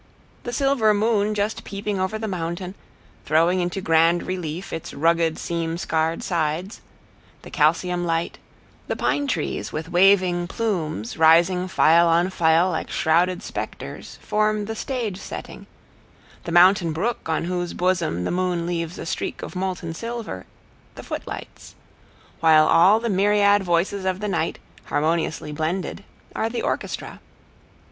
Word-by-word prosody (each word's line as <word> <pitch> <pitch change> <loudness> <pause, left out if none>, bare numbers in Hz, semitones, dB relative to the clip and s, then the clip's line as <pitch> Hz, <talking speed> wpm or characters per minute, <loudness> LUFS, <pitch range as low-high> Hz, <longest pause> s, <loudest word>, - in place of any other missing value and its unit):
The 240 - -3
silver 245 -4 +2
moon 210 0 +1
just 210 +1 -2
peeping 200 0 -4
over 190 +3 -1
the 220 0 -4
mountain, 180 0 -4 0.5
throwing 165 +4 +2
into 180 +2 -2
grand 165 +1 +3
relief 180 -1 -5
its 165 - -6
rugged 165 +2 +2
seam 165 -1 -3
scarred 165 -2 -1
sides, 170 +4 -2 0.6
the - - -11
calcium 175 +3 +1
light; 165 0 -2 0.5
the - - -2
pine 285 -1 0
trees 170 - -2
with 160 +2 -5
waving 180 -1 +4
plumes, 165 - -3
rising 170 +3 +4
file 170 -2 +4
on 170 +3 +2
file 170 +1 +3
like 160 - -3
shrouded 175 +4 +1
specters, - - -7
form 215 0 0
the 220 +1 -5
stage 225 -6 -3
setting; - - -8 0.8
the 170 - -4
mountain 175 -1 +5
brook, 200 +2 -2
on 160 - 0
whose 175 0 -3
bosom 175 - 0
the - - -2
moon 180 -1 -1
leaves 170 -1 -3
a - - -6
streak - - -4
of - - -7
molten 180 -3 -3
silver, 230 - -6 0.5
the - - -9
footlights; - - -8 0.6
while 155 -1 +5
all 190 +6 +5
the 235 - -3
myriad 205 0 +3
voices 180 +3 0
of 185 0 -1
the 210 - -3
night, 175 -4 -1 0.3
harmoniously 160 0 -1
blended, 165 +6 -3 0.3
are 225 - 0
the 235 - -3
orchestra. - - -4
180 Hz, 140 wpm, -23 LUFS, 165-200 Hz, 0.8 s, mountain